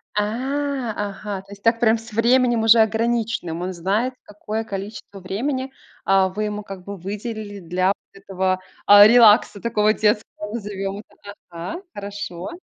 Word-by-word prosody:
А, 260 +4 -1 0.2
ага! 200 -1 -6
То 195 +1 -20
есть 200 0 -12
так 230 0 +3
прям 225 -1 +4
с 225 0 -12
временем 240 0 +3
уже 225 +1 +6
ограниченным. 220 -6 -1
Он 185 +1 -3
знает, 205 +9 -1
какое 210 +2 -5
количество 200 -1 -7
времени, 260 +8 -3 0.4
э, 195 -1 +4
вы 215 - -1
ему, 210 0 -4
как 195 -2 -9
бы, 200 0 -7
выделили 205 +2 -6
для 180 +2 -1
вот 200 - +1 0.2
этого, 190 -1 -2 0.3
а, 205 0 +9
релакса, 220 -3 +5
такого 215 -2 +2
детского, 210 0 -1
назовем 200 -3 -4
это 205 -1 -13 0.2
Ага. 175 - -6
Хорошо. 200 -3 -6
210 Hz, 150 wpm, -22 LUFS, 195-230 Hz, 0.4 s, а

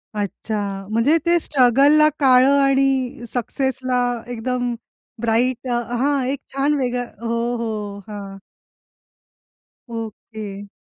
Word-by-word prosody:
अच्छा. 200 -1 -3
म्हणजे 235 +9 +3
ते 345 0 +4
स्ट्रगलला 285 +3 +5
काळं 265 0 +5
आणि 270 -3 +1
सक्सेसला 255 +1 -1 0.3
एकदम 245 +1 -2 0.5
ब्राइट 240 +3 +1
अ, 240 0 +1 0.2
हां. 275 +1 +1
एक 275 +1 -2
छान 280 +2 +1
वेगळं. 245 -2 -1 0.2
हो, 235 +1 -1
हो. 210 -3 -4
हां. 200 -2 -8 1.6
ओके. 215 -2 -7
245 Hz, 100 wpm, -21 LUFS, 220-270 Hz, 1.6 s, स्ट्रगलला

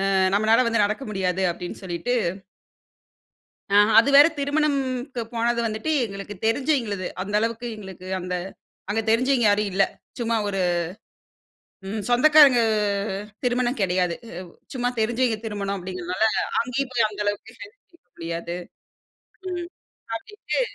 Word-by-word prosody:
அ - - +4 0.2
நம்மனால 220 +4 +4
வந்து 230 -2 +3
நடக்க 215 +6 -3
முடியாது." 190 -1 -1
அப்படீன்னு 175 +2 -7
சொல்லிட்டு 185 +7 -2 1.6
ஆ - - +6 0.2
அது 255 +5 +5
வேற 290 +2 +10
திருமணும்க்கு 275 -3 -1
போனது 235 +1 +1
வந்துட்டு, 220 +7 -3 0.2
எங்களுக்கு 195 0 -7
தெரிஞ்சவிங்களது. 225 - 0 0.2
அந்தளவுக்கு 225 +4 -1
எங்களுக்கு 190 -3 -10
அந்த 180 0 -4 0.6
அங்க 220 +2 +1
தெரிஞ்சவிங்க 245 +2 +3
யாரும் 205 0 +2
இல்ல. 195 +1 +4 0.4
சும்மா 230 -1 0
ஒரு 195 -2 -1 1.3
ம் 210 +2 -3
சொந்தக்காரங்க 275 0 +7 0.8
திருமணம் 245 +1 +1
கெடையாது. 180 -2 +1
அ - - -10 0.4
சும்மா 245 -2 -1
தெரிஞ்சவிங்க 235 +1 +1
திருமணம் 200 -2 -3
அப்படீங்கிறதுனால, 180 +2 -2 0.4
அங்கேயும் 250 +3 -2
போய் 230 -3 +3
அந்த 210 0 -9
அளவுக்கு 205 +3 -3
ஹெல்ப் 425 +5 -12
கேட்க 340 - -25
முடியாது, 170 +1 -5 0.9
ம் 350 -1 -4 0.5
அப்படீன்ட்டு 420 - -4
225 Hz, 120 wpm, -24 LUFS, 195-255 Hz, 1.6 s, வேற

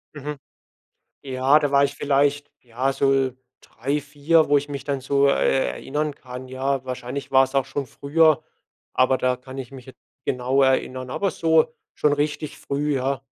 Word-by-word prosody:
Mhm. 145 0 -5 0.9
Ja, 135 +2 +3
da 145 -2 -1
war 140 0 +5
ich 140 0 -2
vielleicht, 145 +1 +1
ja, 125 +3 -2
so 135 -1 +2 0.3
3, 140 +6 -3
4, 150 +3 +2
wo 145 - +5
ich 145 +1 0
mich 140 -2 -6
dann 140 -2 -2
so, 140 +2 +2
äh, 135 -1 +2
erinnern 150 +1 -3
kann. 130 -1 -9
Ja, 130 +1 -2
wahrscheinlich 130 +1 -5
war's 135 0 +4
auch 135 -1 +2
schon 140 0 -4
früher, 155 +4 +2 0.5
aber 130 0 +3
da 125 0 +1
kann 130 +1 -11
ich 130 -3 -6
mich 130 -3 -12
jetzt 130 -2 -14 0.3
genau 130 +2 +1
erinnern. 130 -1 0
Aber 195 +7 0
so 160 -2 +2 0.2
schon 150 - +2
richtig 150 +1 -2
früh, 145 +1 -2
ja. 135 +1 -1
140 Hz, 170 wpm, -23 LUFS, 130-145 Hz, 0.9 s, war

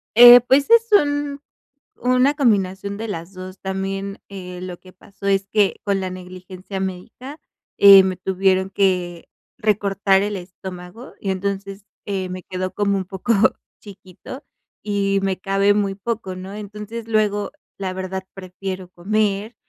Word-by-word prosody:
Eh, 245 +1 +11
pues, 270 - +2
es 460 0 +6
un 290 -5 +2 0.6
una 255 +3 +2
combinación 200 -7 0
de 225 +1 -5
las 170 -1 -6
2. 185 +1 -9
También, 195 +1 -4
eh, 180 -2 -8
lo 180 -1 -7
que 185 -1 -17
pasó 195 +1 -14
es 195 0 +1
que 205 -3 +2
con 200 -1 0
la 185 -1 -3
negligencia 185 +1 -8
médica, 225 - -7 0.4
eh, 195 -1 +9
me 185 -1 -1
tuvieron 190 0 +1
que 180 -3 -1 0.3
recortar 200 -3 +1
el 205 0 -2
estómago, 180 +4 -10
y 195 - -4
entonces, 195 +1 -4 0.2
eh, 195 -3 -3
me 185 0 -7
quedó 185 0 -4
como 200 0 0
un 190 - -3
poco 195 +5 -1 0.5
chiquito, 200 - -12 0.4
y 200 -1 0
me 190 -1 0
cabe 195 +1 +2
muy 200 -2 -1
poco, 200 -2 -4
¿no? 185 +2 -8
Entonces, 210 +2 -8
luego, 210 -2 0 0.3
la 190 -2 -4
verdad, 190 0 -5
prefiero 185 -1 -7
comer 210 +4 -1
195 Hz, 145 wpm, -21 LUFS, 185-210 Hz, 0.6 s, Eh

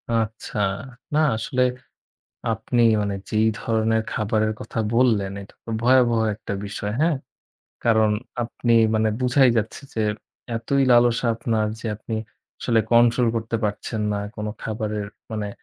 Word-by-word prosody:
আচ্ছা। 110 -1 -2 0.6
না 155 - +3 0.2
আসলে 125 +3 0 0.9
আপনি 120 +2 0 0.2
মানে 100 -1 -1
যেই 110 +1 +3
ধরনের 110 0 +1
খাবারের 110 0 +1
কথা 115 - -5
বললেন, 110 -6 +3
এটা 100 - -14
তো - - -8
ভয়াবহ 120 -2 +4 0.2
একটা 100 - -6
বিষয়, 105 +1 -4
হ্যাঁ? 165 -2 +3 0.7
কারণ 110 -2 +4 0.3
আপনি 115 0 0 0.2
মানে 110 0 +2
বুঝাই 125 +1 +4
যাচ্ছে 110 +5 -3
যে 110 - 0 0.5
এতই 140 +4 +1
লালসা 120 0 +4
আপনার 110 -2 0
যে - - -6
আপনি 110 +1 -6 0.5
আসলে 115 -2 +2
control 120 +1 +5
করতে 115 +1 -2
পারছেন 105 +2 -2
না 100 - -1 0.2
কোন 105 0 -4 0.2
খাবারের। 105 -1 -3 0.2
মানে, 105 -2 -3
110 Hz, 135 wpm, -23 LUFS, 110-120 Hz, 0.9 s, control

